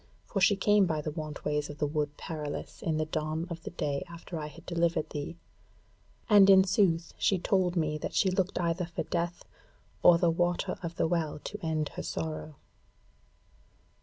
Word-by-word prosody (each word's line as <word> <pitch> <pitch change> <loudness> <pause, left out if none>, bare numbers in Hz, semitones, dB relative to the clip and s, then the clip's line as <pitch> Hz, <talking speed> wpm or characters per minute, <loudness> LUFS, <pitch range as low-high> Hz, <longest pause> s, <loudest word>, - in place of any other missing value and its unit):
For 195 - -2
she 200 +2 +5
came 205 0 +4
by 155 -2 -1
the 155 - -3
want 155 -2 -6
ways 150 0 0
of 145 - -8
the 150 - 0
Wood 150 0 -2
Perilous 150 -3 -6
in 160 -2 0
the 155 - 0
dawn 155 +1 -2
of 170 -1 -5
the - - -6
day 145 -4 -2
after 170 0 -7
I 150 - -4
had 165 +3 -13
delivered 170 -2 0
thee; 150 +3 -5 0.9
and 205 -3 +7
in 190 -1 +8
sooth 185 -4 +2
she 195 - +3
told 185 0 +1
me 155 -2 0
that - - -5
she 190 - +3
looked 185 0 0
either 170 0 0
for 170 - -4
Death, 170 0 -3 0.6
or 175 - +7
the 170 -1 +3
Water 175 +1 0
of 170 -1 -5
the - - +1
Well 160 -3 -1
to 210 -1 -7
end 155 -2 -1
her - - -6
sorrow." 155 -1 -4
165 Hz, 190 wpm, -30 LUFS, 155-180 Hz, 0.9 s, in